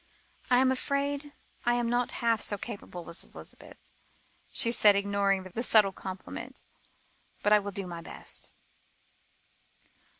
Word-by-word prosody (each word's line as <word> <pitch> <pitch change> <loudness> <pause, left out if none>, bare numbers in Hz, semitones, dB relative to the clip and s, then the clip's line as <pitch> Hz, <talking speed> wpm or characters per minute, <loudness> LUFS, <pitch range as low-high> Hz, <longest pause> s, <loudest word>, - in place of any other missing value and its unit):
"I 250 - +5
am 260 +1 +4
afraid 280 +2 -1 0.3
I 240 0 +3
am 240 -1 0
not 240 +1 0
half 230 -2 +3
so 205 - 0
capable 195 -6 -8
as 170 - -7
Elizabeth," - - -12 0.6
she 235 -3 +4
said, 210 -3 +7
ignoring 200 -1 +1
the 185 +5 -4
subtle 215 -5 +5
compliment, 190 0 -8 0.8
"but 210 - +5
I 210 - +7
will 200 0 -5
do 195 0 -3
my 170 -2 -7
best." - - -5
210 Hz, 135 wpm, -29 LUFS, 195-245 Hz, 0.8 s, said